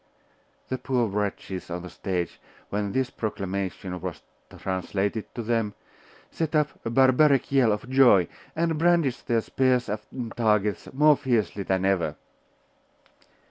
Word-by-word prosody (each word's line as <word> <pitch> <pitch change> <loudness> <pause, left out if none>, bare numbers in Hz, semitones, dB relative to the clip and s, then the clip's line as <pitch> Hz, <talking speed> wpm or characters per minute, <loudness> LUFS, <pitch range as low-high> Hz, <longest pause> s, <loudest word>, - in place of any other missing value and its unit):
The 130 - -2
poor 125 -3 +1
wretches 100 -2 -3
on 90 0 -4
the 90 - -7
stage, 90 -3 -3 0.3
when 100 0 -1
this 130 +3 0
proclamation 95 -3 -4
was 90 -4 -6 0.3
translated 95 +3 -2
to 120 - -3
them, 110 -2 0 0.6
set 160 -1 -2
up 150 -1 +3
a - - -2
barbaric 135 +3 +4
yell 130 -5 +4
of 105 +5 -3
joy, 125 -9 +5 0.3
and 165 -1 0
brandished 165 -6 +2
their 115 -2 +2
spears 125 -1 +1
and 110 +3 -5
targets 105 -3 +1
more 150 +2 +5
fiercely 120 -7 0
than 95 -1 0
ever. 95 -3 +1
110 Hz, 135 wpm, -26 LUFS, 100-130 Hz, 0.6 s, joy